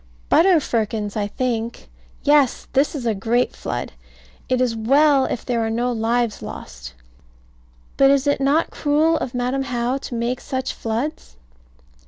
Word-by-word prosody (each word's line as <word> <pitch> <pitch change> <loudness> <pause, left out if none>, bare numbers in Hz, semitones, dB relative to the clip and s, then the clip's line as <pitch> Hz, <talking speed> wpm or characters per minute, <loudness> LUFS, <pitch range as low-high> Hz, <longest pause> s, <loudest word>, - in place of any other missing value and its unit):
Butter 360 -1 +5
firkins, 215 -5 -2
I 205 -2 -1
think. 235 0 -3 0.4
Yes. 290 -3 +3
This 275 +3 +2
is 260 -4 -4
a 225 - +2
great 230 +5 0
flood. - - -4 0.6
It 255 -1 +2
is 250 -3 +1
well 275 +4 +4
if - - -4
there 235 -2 0
are 225 - -1
no 240 +2 0
lives 230 -1 0
lost. - - -9 1.0
But 275 0 +6
is 275 0 +3
it 285 -1 +1
not 285 +4 +2
cruel 310 +2 +2
of 250 - -4
Madam 250 +2 -1
How 250 0 -1
to 255 - -7
make 240 +2 -2
such 260 0 -3
floods? 230 - -4
250 Hz, 155 wpm, -21 LUFS, 225-275 Hz, 1.0 s, But